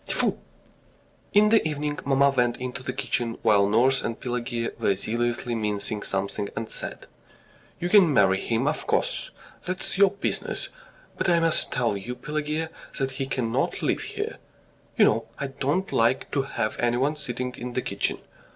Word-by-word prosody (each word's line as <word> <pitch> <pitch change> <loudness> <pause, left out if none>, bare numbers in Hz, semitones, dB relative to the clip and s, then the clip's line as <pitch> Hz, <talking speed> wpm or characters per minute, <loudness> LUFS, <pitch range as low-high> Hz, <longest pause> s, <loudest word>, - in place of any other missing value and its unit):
Tfoo!" - - 0 0.9
In 210 +1 +6
the 225 0 +5
evening 150 -1 -2
mamma 140 0 +4
went 120 -3 +1
into 125 0 -5
the - - -3
kitchen, 115 -1 -2
while 105 -3 +5
nurse 125 +5 +4
and 115 - -3
Pelageya 120 -1 -2
were 100 - +2
zealously 120 +4 -1
mincing 105 -1 -2
something, 100 +1 -2
and 115 -1 -4
said: - - -6 0.7
"You 175 - -1
can 180 -4 +6
marry 95 -6 +4
him, 120 +4 0
of 150 - -1
course - - 0 0.3
that's 185 +1 -3
your 200 -1 +7
business 200 +1 -2 0.5
but - - +2
I 170 -1 +5
must 165 -1 +2
tell 120 -4 +1
you, 115 +6 -5
Pelageya, 155 +3 -3 0.3
that 135 -1 0
he 135 - -1
cannot 120 -4 -1
live - - +1
here.... - - -4 0.6
You - - +7
know 110 +1 +2
I - - -2
don't 145 +8 -1
like 115 +3 +2
to 140 - +2
have 120 -5 -2
anyone 125 +5 +2
sitting 125 -3 -3
in 125 0 -6
the 130 - -1
kitchen. 100 - -1
125 Hz, 165 wpm, -26 LUFS, 115-150 Hz, 0.9 s, your